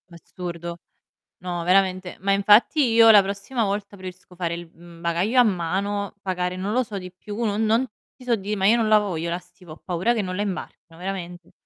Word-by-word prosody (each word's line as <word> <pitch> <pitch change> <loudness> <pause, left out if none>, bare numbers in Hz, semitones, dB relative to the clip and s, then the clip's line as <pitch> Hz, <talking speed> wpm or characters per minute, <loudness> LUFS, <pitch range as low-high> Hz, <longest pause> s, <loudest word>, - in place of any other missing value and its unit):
Assurdo. 170 0 -7 0.6
No, 175 -1 -4
veramente, 185 0 +1
ma 195 - +1
infatti 210 +8 +4
io 225 0 +8
la 205 -2 +8
prossima 200 +5 -3
volta 200 0 -3
preferisco 185 -1 -11
fare 170 -1 -2
il, 170 -1 -9
mhmm, 170 0 -15
bagaglio 175 +9 +1
a - - +8
mano, 200 +1 -1
pagare, 180 -1 -2
non 190 +3 -3
lo 255 - +3
so, 215 -4 -6
di 180 -1 -8
più 205 +5 -6
non 215 0 0
non 225 +4 +2 0.3
ti 255 - -16
so 245 -2 +2
di' 205 +1 -4
ma 195 -1 -1
io 225 +4 +5
non 225 -2 +1
la 215 0 +6
voglio 175 -5 -2
la 170 - -1
stiva, 180 -1 -16
ho - - -13
paura 180 +6 -1
che 215 - 0
non 185 -1 -4
la 205 - -2
imbarcano, 175 -4 -6
veramente. 180 -2 -6
190 Hz, 210 wpm, -23 LUFS, 175-210 Hz, 0.6 s, io